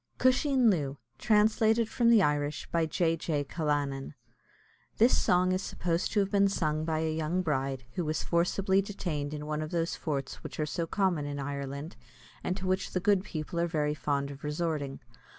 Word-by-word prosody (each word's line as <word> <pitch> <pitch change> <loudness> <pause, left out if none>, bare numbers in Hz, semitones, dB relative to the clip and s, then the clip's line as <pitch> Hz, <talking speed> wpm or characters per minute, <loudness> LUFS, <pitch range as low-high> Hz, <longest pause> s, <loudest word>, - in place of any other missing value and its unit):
CUSHEEN 255 -2 +4
LOO. 145 -6 -1 0.2
TRANSLATED 220 +1 +3
FROM 235 +1 +2
THE 225 -4 +6
IRISH 145 -1 -1
BY 165 -1 +1
J. 165 +1 +1
J. 155 -3 -1
CALLANAN. 145 -2 -2 0.8
[This 235 +4 +5
song 180 0 +3
is 185 +1 0
supposed 175 -2 -1
to 210 - +2
have 195 0 -1
been 200 -1 +4
sung 155 -5 0
by 160 -1 0
a 160 -1 0
young 160 +4 -1
bride, 135 -4 -1
who 175 - -2
was 155 0 -1
forcibly 190 +3 +2
detained 170 -8 -4
in 150 0 -5
one 150 0 -2
of 155 - -4
those 170 0 -1
forts 140 -4 -4
which - - -8
are 155 - +1
so 165 +2 -3
common 175 -6 0
in 145 0 -4
Ireland, 140 +3 -5 0.5
and 185 - -1
to 190 - -5
which 185 +1 -1
the 185 - +1
good 200 0 +3
people 160 -2 -4
are 170 - +2
very 150 -3 0
fond 140 -1 -1
of 140 0 -11
resorting. 150 -2 -2
160 Hz, 185 wpm, -30 LUFS, 150-190 Hz, 0.8 s, THE